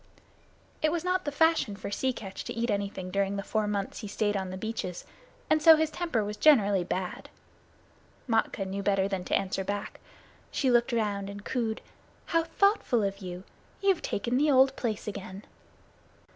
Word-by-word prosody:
It 310 Hz, -, +3 dB
was 340 Hz, 0 st, -1 dB
not 365 Hz, 0 st, 0 dB
the 290 Hz, -, -1 dB
fashion 320 Hz, -8 st, +2 dB
for 200 Hz, 0 st, -6 dB
Sea 260 Hz, +5 st, 0 dB
Catch 195 Hz, -6 st, -7 dB
to -, -, -4 dB
eat 235 Hz, +1 st, -1 dB
anything 200 Hz, -2 st, -3 dB
during 200 Hz, 0 st, 0 dB
the 200 Hz, -, -3 dB
four 215 Hz, 0 st, -1 dB
months 200 Hz, -2 st, -2 dB
he 210 Hz, -, -6 dB
stayed 205 Hz, +1 st, 0 dB
on 190 Hz, -1 st, -2 dB
the 185 Hz, -, -5 dB
beaches, 205 Hz, -4 st, -4 dB, 0.4 s
and 310 Hz, 0 st, +3 dB
so 320 Hz, +1 st, +9 dB
his 315 Hz, 0 st, 0 dB
temper 330 Hz, -11 st, -1 dB
was 210 Hz, +1 st, -5 dB
generally 205 Hz, -11 st, +5 dB
bad. 180 Hz, +1 st, -4 dB, 1.0 s
Matkah 225 Hz, -3 st, +1 dB
knew 195 Hz, +1 st, -4 dB
better 195 Hz, -1 st, +2 dB
than 195 Hz, -2 st, -3 dB
to -, -, +2 dB
answer 195 Hz, 0 st, -2 dB
back. 200 Hz, +1 st, -4 dB, 0.5 s
She 265 Hz, -3 st, +1 dB
looked 240 Hz, 0 st, +3 dB
round 205 Hz, -4 st, -1 dB
and 205 Hz, 0 st, -9 dB
cooed: 230 Hz, -4 st, -2 dB, 0.4 s
"How 330 Hz, -1 st, +2 dB
thoughtful 330 Hz, -, +2 dB
of 195 Hz, 0 st, -2 dB
you. 180 Hz, -2 st, -7 dB, 0.4 s
You've 390 Hz, -3 st, +2 dB
taken 240 Hz, +5 st, -1 dB
the 300 Hz, +1 st, +3 dB
old 265 Hz, 0 st, +5 dB
place 220 Hz, -4 st, -3 dB
again." 200 Hz, -1 st, -7 dB
210 Hz, 180 wpm, -29 LUFS, 195-265 Hz, 1.0 s, so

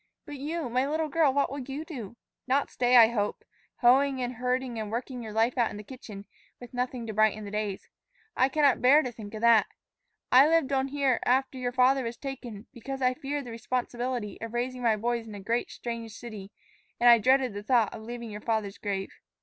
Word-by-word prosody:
But 290 Hz, -1 st, -8 dB
you, 305 Hz, +2 st, -3 dB
my 255 Hz, +3 st, 0 dB
little 310 Hz, +1 st, -1 dB
girl, 305 Hz, -1 st, +3 dB
what 280 Hz, -1 st, 0 dB
will 280 Hz, -, -4 dB
you 275 Hz, +4 st, -6 dB
do? 240 Hz, -, -8 dB, 0.3 s
Not 275 Hz, +2 st, +1 dB
stay, 245 Hz, 0 st, +3 dB
I 225 Hz, -2 st, +8 dB
hope, 210 Hz, -3 st, -2 dB, 0.4 s
hoeing 265 Hz, +2 st, +4 dB
and 250 Hz, 0 st, -2 dB
herding 250 Hz, -1 st, -1 dB
and 215 Hz, -1 st, -5 dB
working 245 Hz, +2 st, -4 dB
your 220 Hz, -2 st, -7 dB
life 225 Hz, +4 st, +1 dB
out 235 Hz, -, +3 dB
in -, -, -8 dB
the 210 Hz, -, -8 dB
kitchen, 210 Hz, -4 st, -10 dB, 0.3 s
with 245 Hz, 0 st, -12 dB
nothing 250 Hz, -1 st, -3 dB
to 220 Hz, -, -5 dB
brighten 215 Hz, 0 st, +2 dB
the 200 Hz, -, -7 dB
days. 210 Hz, -2 st, -3 dB, 0.5 s
I 260 Hz, +2 st, +3 dB
cannot 285 Hz, -1 st, +3 dB
bear 285 Hz, +5 st, +6 dB
to 250 Hz, -, -4 dB
think 220 Hz, -2 st, -10 dB
of 215 Hz, -, -6 dB
that. 230 Hz, -2 st, +5 dB, 0.6 s
I 265 Hz, +3 st, +8 dB
lived 320 Hz, -4 st, +2 dB
on 265 Hz, 0 st, +1 dB
here 275 Hz, -3 st, +1 dB
after 260 Hz, +1 st, +1 dB
your 245 Hz, -1 st, -2 dB
father 260 Hz, +1 st, +3 dB
was 235 Hz, 0 st, -5 dB
taken 245 Hz, -6 st, -7 dB
because 270 Hz, +2 st, -6 dB
I 255 Hz, 0 st, +3 dB
feared 285 Hz, 0 st, -4 dB
the 240 Hz, -, -8 dB
responsibility 240 Hz, -1 st, -3 dB
of 230 Hz, +1 st, -6 dB
raising 250 Hz, +1 st, -2 dB
my 230 Hz, -3 st, +3 dB
boys 235 Hz, +1 st, -2 dB
in 215 Hz, -, -8 dB
a -, -, -7 dB
great, 230 Hz, +5 st, -1 dB
strange 230 Hz, -2 st, -6 dB
city; 215 Hz, -4 st, -9 dB, 0.5 s
and 240 Hz, -, +4 dB
I 235 Hz, -1 st, +8 dB
dreaded 260 Hz, 0 st, +3 dB
the 205 Hz, -, -5 dB
thought 225 Hz, -1 st, +2 dB
of 225 Hz, -, -8 dB
leaving 235 Hz, 0 st, -7 dB
your 210 Hz, 0 st, -7 dB
father's 220 Hz, -3 st, -2 dB
grave. 195 Hz, -2 st, -3 dB
245 Hz, 215 wpm, -28 LUFS, 225-265 Hz, 0.6 s, I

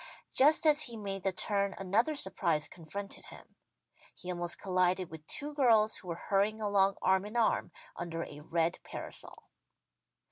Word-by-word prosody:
Just 305 Hz, +5 st, +5 dB
as 305 Hz, 0 st, +5 dB
he 235 Hz, -2 st, -5 dB
made 195 Hz, -2 st, -5 dB
the 195 Hz, -, 0 dB
turn 200 Hz, +1 st, 0 dB
another 215 Hz, +11 st, +1 dB
surprise 170 Hz, -, +2 dB
confronted 190 Hz, +4 st, -7 dB
him. -, -, -14 dB, 0.6 s
He 180 Hz, -, -6 dB
almost 175 Hz, -1 st, -2 dB
collided 185 Hz, -1 st, 0 dB
with 160 Hz, -1 st, -11 dB
two 295 Hz, 0 st, -1 dB
girls 225 Hz, -6 st, +4 dB
who 185 Hz, -, -12 dB
were 170 Hz, 0 st, -5 dB
hurrying 205 Hz, +2 st, +2 dB
along 200 Hz, -2 st, +2 dB
arm 190 Hz, 0 st, +3 dB
in 210 Hz, +3 st, -8 dB
arm, 230 Hz, -, +1 dB, 0.2 s
under 170 Hz, -1 st, -4 dB
a 145 Hz, -, -10 dB
red 165 Hz, +2 st, -1 dB
parasol. -, -, -8 dB
195 Hz, 155 wpm, -32 LUFS, 175-220 Hz, 0.6 s, Just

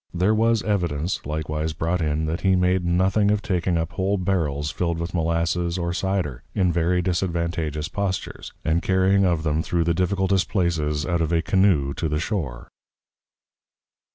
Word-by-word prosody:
There 95 Hz, +5 st, +3 dB
was 115 Hz, 0 st, +2 dB
Evidence 85 Hz, -5 st, -1 dB
likewise 75 Hz, +1 st, -2 dB
brought 85 Hz, +3 st, -1 dB
in, 75 Hz, 0 st, 0 dB
that 80 Hz, +2 st, -2 dB
he 95 Hz, -1 st, +3 dB
made 90 Hz, 0 st, +2 dB
nothing 95 Hz, +4 st, +2 dB
of 105 Hz, 0 st, +1 dB
taking 90 Hz, -2 st, 0 dB
up 80 Hz, +1 st, -2 dB
whole 95 Hz, +2 st, 0 dB
Barrels 75 Hz, -6 st, -1 dB
fill'd 85 Hz, -1 st, -1 dB
with 85 Hz, +2 st, -4 dB
Malasses 85 Hz, +1 st, 0 dB
or 85 Hz, -1 st, -2 dB
Cider, 90 Hz, -9 st, -2 dB
in 90 Hz, -3 st, +2 dB
very 90 Hz, +2 st, +1 dB
disadvantageous 85 Hz, -4 st, -1 dB
Postures, 100 Hz, -2 st, -4 dB
and 80 Hz, +2 st, +2 dB
Carrying 95 Hz, +1 st, +3 dB
of 85 Hz, -3 st, +1 dB
them 75 Hz, 0 st, +1 dB
through 85 Hz, 0 st, 0 dB
the 85 Hz, +1 st, +1 dB
difficultest 95 Hz, +2 st, +1 dB
Places 80 Hz, -6 st, 0 dB
out 85 Hz, -2 st, 0 dB
of 80 Hz, 0 st, 0 dB
a 85 Hz, 0 st, +2 dB
Canoo 85 Hz, -6 st, +2 dB
to 80 Hz, -, -2 dB
the 75 Hz, 0 st, 0 dB
Shore. 80 Hz, -, -3 dB
85 Hz, 165 wpm, -23 LUFS, 80-95 Hz, -, There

